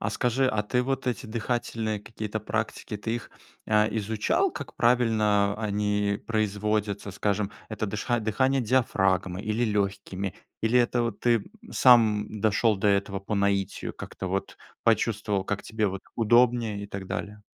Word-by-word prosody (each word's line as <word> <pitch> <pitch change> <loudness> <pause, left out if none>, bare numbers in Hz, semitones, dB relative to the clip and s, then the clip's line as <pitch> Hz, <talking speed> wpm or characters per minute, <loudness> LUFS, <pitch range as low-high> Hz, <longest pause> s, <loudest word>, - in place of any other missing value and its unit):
А 100 - -1
скажи, 125 +4 +1
а 110 -4 +1
ты 125 +4 0
вот 135 +1 -2
эти 120 - -3
дыхательные 110 -1 -2
какие-то 105 +1 -5
практики, 105 - -3
ты 110 +3 -3
их, 120 - -9 0.4
э, 105 0 +3
изучал, 110 - +1
как - - -7
правильно 110 -4 +3
они 105 -1 0
производятся? 105 -1 -1
Скажем, 100 +1 -1 0.2
это 110 0 -3
дыша 105 +4 -1
дыхание 130 +5 +1
диафрагмой 95 -6 +1
или 110 +2 0
лёгкими, 100 -2 -2 0.3
или 115 +3 +3
это 120 0 +2
вот 115 -3 -2
ты, 120 -1 +4
м, 100 - -14
сам 110 -4 +4
дошёл 110 +1 +3
до 95 - -1
этого 100 -1 +1
по 100 +2 -4
наитию, 100 -1 0
как-то 95 - -7
вот 95 +1 -3 0.3
почувствовал, 105 -3 +1
как 100 +1 -3
тебе 110 -2 -1
вот 95 0 -6
удобнее 120 -2 +3
и - - -7
так 100 -1 -6
далее? 105 +1 -5
105 Hz, 155 wpm, -27 LUFS, 100-115 Hz, 0.4 s, ты